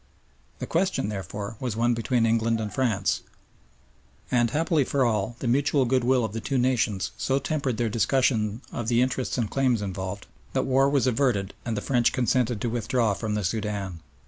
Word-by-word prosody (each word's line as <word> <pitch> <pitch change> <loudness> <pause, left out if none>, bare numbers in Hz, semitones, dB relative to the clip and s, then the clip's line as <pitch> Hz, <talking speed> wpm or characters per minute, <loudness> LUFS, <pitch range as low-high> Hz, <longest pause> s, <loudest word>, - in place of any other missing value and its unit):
The - - -4
question, 180 - 0
therefore, 100 +2 -5
was 125 -4 -3
one 120 +1 +2
between 115 +1 +1
England 115 0 +2
and 105 -2 -4
France; 110 -7 0 1.1
and, 120 -1 +3
happily 155 +2 +1
for 135 0 +1
all, 110 0 0
the 125 - -4
mutual 140 +2 +2
goodwill 125 0 +2
of 110 - -5
the 115 - -3
two 135 +3 -1
nations 120 -6 +1
so 135 - +1
tempered 140 -4 -1
their 120 - +1
discussion 115 -1 +1
of 120 - -4
the 120 0 +3
interests 130 0 -2
and 115 -3 0
claims 130 -1 +1
involved, 95 0 -5 0.3
that - - +1
war 135 +1 +3
was 140 -3 +2
averted 120 -6 +1
and 115 -3 -2
the - - -2
French 120 -2 +2
consented 125 -2 +1
to - - 0
withdraw 120 -2 +1
from 105 +2 -3
the 105 - -1
Soudan. 100 -2 -3
120 Hz, 180 wpm, -26 LUFS, 105-130 Hz, 1.1 s, and